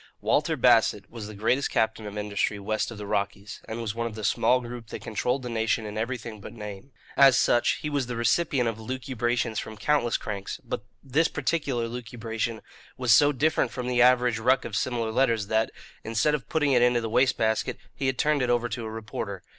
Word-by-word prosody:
Walter - - +1
Bassett - - +3
was 115 -3 -7
the 110 - -9
greatest 125 +7 +1
captain 110 -1 0
of 105 0 -7
industry 105 0 -1
west 105 +2 -2
of 115 - -8
the 105 - -6
Rockies, 100 0 -3
and 115 +1 -5
was 110 -3 -3
one 115 +1 -2
of 110 - -7
the 110 - -7
small 125 +5 +3
group 120 -2 -8
that - - -8
controlled 125 +4 -1
the - - -4
nation 115 -1 0
in 105 0 -6
everything 115 -1 -4
but - - -9
name. 105 +3 -8 0.2
As 135 -3 +7
such, 120 +3 +3
he - - -1
was 140 -4 0
the 125 - -4
recipient 125 +2 +1
of 115 -1 -3
lucubrations 120 -1 -2
from 110 -1 -7
countless 120 0 +1
cranks; 100 -2 -5
but - - -4 0.2
this 150 +5 +2
particular 140 -5 -1
lucubration 115 -1 -4 0.4
was 125 -2 +4
so 145 0 +6
different 145 -2 +1
from 125 +1 -5
the 125 -1 +2
average 125 -2 +4
ruck 130 +3 +2
of 115 -3 -5
similar 115 0 -1
letters 115 -3 +2
that, 110 0 +2 0.3
instead 115 +7 +1
of 135 -7 -3
putting 150 -3 +2
it 125 -2 +4
into 120 0 +4
the 115 - -3
waste 125 +4 +2
basket, 110 0 0 0.2
he 135 - -2
had 130 -1 0
turned 150 0 +2
it 125 - 0
over 120 0 +2
to 120 0 -5
a - - -4
reporter. 110 -3 -6
115 Hz, 210 wpm, -26 LUFS, 110-125 Hz, 0.4 s, As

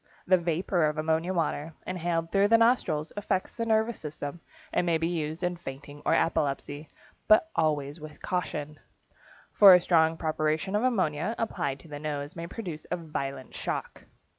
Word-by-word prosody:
The 185 0 +4
vapor 170 0 +1
of 150 0 -2
ammonia 160 +3 0
water, 160 -3 -2
inhaled 170 -2 -2
through 200 0 +4
the 230 +2 +6
nostrils, 205 -10 +2
affects 195 -2 -2
the 230 -1 -2
nervous 220 0 +1
system 150 +1 -6 0.3
and - - +2
may 170 -2 +2
be 165 +1 0
used 160 0 -3
in 175 0 -1
fainting 145 -1 -9
or - - +3
epilepsy, 145 -1 -1 0.4
but 215 +10 +5
always 150 -1 0
with 155 0 -10
caution, 155 -4 -3 0.7
for 195 -3 +9
a - - +6
strong 165 -2 +3
preparation 155 +4 -1
of 210 - +2
ammonia 190 -5 0
applied 140 -11 -2
to - - -15
the 145 -1 -7
nose 145 -1 -4
may 170 0 -5
produce 170 -6 -7
a - - 0
violent 140 -5 -5
shock. - - -4
165 Hz, 165 wpm, -28 LUFS, 150-185 Hz, 0.7 s, for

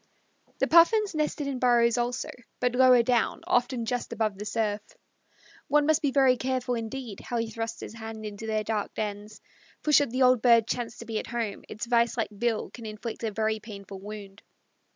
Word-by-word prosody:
The - - +2
Puffins 390 +5 +5
nested 305 -1 -1
in 275 -2 -3
burrows 240 -2 +4
also, 245 +1 -2 0.3
but 250 -1 +1
lower 250 -1 +6
down 240 -1 +1
often 245 -1 +1
just 245 +1 -3
above 215 -2 -1
the 210 - -5
surf. 215 -1 -1 0.9
One 295 +1 +3
must 315 +1 +3
be 290 - +2
very 265 -2 +4
careful, 255 0 -1
indeed, 230 -2 -5
how 240 - -4
he 230 -1 -2
thrusts 225 +1 -5
his - - -7
hand 220 -1 -7
into 210 +1 -7
their 215 -1 0
dark 210 -1 -3
dens, 210 0 -5 0.4
for 305 - +1
should 285 -2 +5
the 255 +3 +1
old 255 -2 +5
bird 235 -2 +5
chance 240 -1 -3
to 235 - -9
be 225 -2 -2
at - - -7
home, 230 -3 -3
its 215 - -5
vise 235 0 +2
like 225 - 0
bill 230 +1 -1
can 230 -3 -9
inflict 215 +2 -6
a 225 - 0
very 220 +1 -1
painful 200 -3 -9
wound. 200 0 -9
235 Hz, 195 wpm, -27 LUFS, 215-250 Hz, 0.9 s, lower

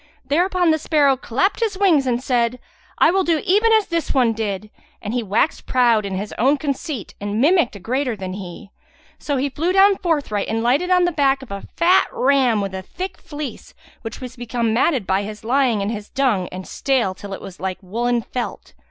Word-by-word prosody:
Thereupon 350 +4 +2
the 315 - +1
sparrow 290 -3 +3
clapped 265 - -1
his 440 -5 -1
wings 335 -9 +3
and 245 0 0
said, 245 -2 +1 0.4
"I 330 - +5
will 385 +1 +2
do 335 -3 +1
even 420 +5 +3
as 435 -2 +4
this 335 -4 -2
one 245 -4 +3
did;" 210 -1 -4 0.3
and 210 +1 -5
he 245 - 0
waxed 215 +8 0
proud 235 -5 +3
in 190 - -4
his 205 +2 -4
own 270 +6 +3
conceit 280 - -4
and 205 +1 -2
mimicked 300 - +3
a - - -8
greater 250 +4 -1
than 190 -2 -6
he. 190 0 -9 0.5
So 285 -2 -2
he 270 +2 0
flew 320 +6 -1
down 390 0 +5
forthright 290 - -1
and 225 +1 -1
lighted 280 +10 +2
on 365 -1 +4
the 350 - +1
back 275 -3 +1
of 250 - -12
a 200 0 -6
fat 350 +2 +4
ram 255 -5 +2
with 195 -1 -4
a 190 - -4
thick 365 - -7
fleece 295 -2 -8 0.3
that 225 - -7
was 255 -1 -8
become 235 -2 -2
matted 250 - +2
by 190 +1 +1
his 210 +1 -7
lying 245 -2 +2
in 200 - -1
his 210 -2 -6
dung 245 -9 +1
and 185 0 -7
stale 255 -9 0
till 200 +1 -10
it 195 - -5
was 185 - -10
like 185 0 -3
woollen 235 +5 -1
felt. 245 +1 -6
250 Hz, 210 wpm, -21 LUFS, 210-310 Hz, 0.5 s, I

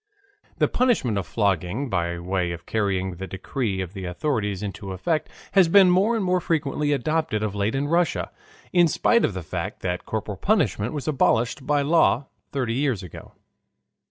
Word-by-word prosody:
The - - +3
punishment 215 - +1
of 95 - -5
flogging 100 - 0
by 85 -5 -1
way 90 0 -1
of 85 0 -9
carrying 95 -4 -1
the 95 +1 -6
decrees 95 0 -3
of 90 0 -9
the 95 -3 -6
authorities 105 - -2
into 100 -1 -5
effect 155 - -1 0.2
has 190 -3 +5
been 185 +1 +6
more 200 +6 +3
and 215 -4 0
more 180 0 +2
frequently 150 -2 0
adopted 145 -5 0
of 105 -2 -2
late 105 +4 -1
in 140 +2 0
Russia, 170 +2 +1 0.4
in 175 -2 +6
spite 235 +8 +2
of 100 - 0
the 95 - -4
fact - - -5
that 90 0 -3
corporal 105 -2 -3
punishment 120 - +1
was 145 -1 -5
abolished 130 -2 +1
by 145 -1 +2
law 145 -3 +3 0.3
thirty 125 -5 -1
years 130 -6 0
ago. 90 - -11
115 Hz, 175 wpm, -24 LUFS, 95-155 Hz, 0.4 s, been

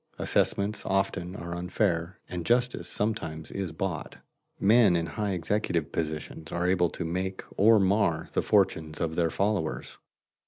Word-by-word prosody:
Assessments 100 +2 0
often 95 -2 -1
are 85 -3 -6
unfair, 90 -1 -1
and 90 -1 -4
justice 120 -5 +1
sometimes 80 -7 -2
is 95 -4 -3
bought. 85 0 -4 0.4
Men 105 -2 +5
in 85 -1 +1
high 105 +3 -2
executive 90 -3 -1
positions 80 0 -4
are 85 +1 0
able 90 -2 +3
to 85 - -5
make 95 +3 -3
or 110 +2 +6
mar 95 -4 +2
the - - +2
fortunes 80 -1 +1
of 80 -1 -1
their 85 -1 +2
followers. 100 -3 -1
90 Hz, 145 wpm, -28 LUFS, 85-100 Hz, 0.4 s, or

